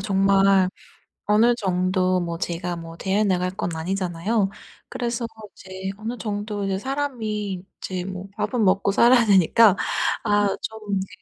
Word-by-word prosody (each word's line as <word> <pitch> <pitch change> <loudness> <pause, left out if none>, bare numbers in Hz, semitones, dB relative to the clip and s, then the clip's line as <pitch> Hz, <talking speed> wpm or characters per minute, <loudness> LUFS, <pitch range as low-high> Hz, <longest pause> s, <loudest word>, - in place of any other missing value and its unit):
정말 195 -1 +3 0.6
어느 220 +4 +4
정도 185 -2 +1
뭐 170 -1 -4
제가 175 0 -3
뭐 165 0 -9
대회 195 +4 0
나갈 180 -2 +1
건 180 -2 -4
아니잖아요. 190 +4 -1 0.4
그래서 235 -1 -3 0.3
이제 190 0 -7
어느 230 +3 -5
정도 205 -1 -3
이제 195 -1 -1
사람이 215 -7 -3
이제 185 -1 -4
뭐 190 0 -7
밥은 210 +2 0
먹고 195 +1 +2
살아야 240 +3 +5
되니까 200 +1 +5 0.5
아 205 -2 +2
좀 215 -2 -4
이제 190 0 -2
195 Hz, 275 characters per minute, -23 LUFS, 185-215 Hz, 0.6 s, 살아야